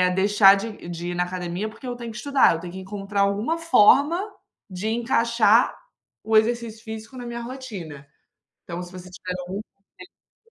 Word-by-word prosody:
deixar 195 0 +6
de 205 -3 -6
de 175 0 -5
ir - - -4
na 180 - +1
academia 180 +3 -4
porque 250 +4 -11
eu 245 - -3
tenho 235 -1 -7
que 215 - -9
estudar, 280 - +3
eu - - -5
tenho 175 +1 -8
que 190 - -7
encontrar 200 +1 -3
alguma 205 +11 +1
forma 330 0 +5 0.5
de 185 +3 -4
encaixar 230 -1 +3 0.5
o 220 - 0
exercício 225 0 0
físico 220 +2 -8
na 245 - -7
minha 235 0 -5
rotina". 210 - -8 0.6
Então, 175 +1 -5
se 175 - -10
você 185 0 -10
tiver 180 0 -6
algum 185 +3 -5 0.7
conselho 460 - -36
210 Hz, 175 wpm, -24 LUFS, 185-235 Hz, 0.7 s, deixar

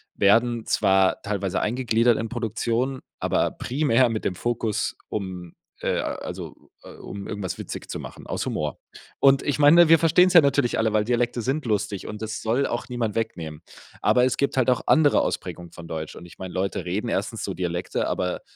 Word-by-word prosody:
werden 115 +3 +3
zwar 95 -2 +2
teilweise 100 -3 -2
eingegliedert 120 0 +2
in 115 0 -3
Produktionen, 120 +3 -2 0.2
aber - - +1
primär 130 -2 +1
mit 110 -1 -3
dem - - 0
Fokus, 115 0 -1
um, 90 -4 -5 0.3
äh - - 0
also, - - -7
äh, - - -11
um 100 -1 -8
irgendwas 100 -4 -4
witzig - - -7
zu - - -4
machen - - -10
aus - - -3
Humor. 75 -1 -3 0.4
Und 135 0 +5
ich 145 -1 -1
meine, 160 +4 +7
wir 165 +1 +7
verstehen's 175 +3 +4
ja 175 - +9
natürlich 140 -3 +1
alle, 110 -1 +1
weil 105 0 +1
Dialekte 120 0 0
sind 135 +6 -2
lustig, 105 -3 -1
und 105 0 -7
das 110 0 -4
soll 120 +5 +1
auch 120 - -4
niemand 120 -4 -2
wegnehmen. 80 -9 -4 0.4
Aber 125 0 +4
es 130 - +1
gibt 140 -1 -1
halt 130 -1 +3
auch 125 - +2
andere 150 -2 +5
Ausprägungen 85 -1 -4
von 85 -1 -11
Deutsch, 80 -1 -5
und 85 - -10
ich 85 - -15
meine, 95 -1 -7
Leute 95 0 -2
reden 90 +4 -2
erstens - - -2
so - - -3
Dialekte, 90 -1 -2
aber 90 -1 -2
115 Hz, 190 wpm, -24 LUFS, 95-125 Hz, 0.4 s, ja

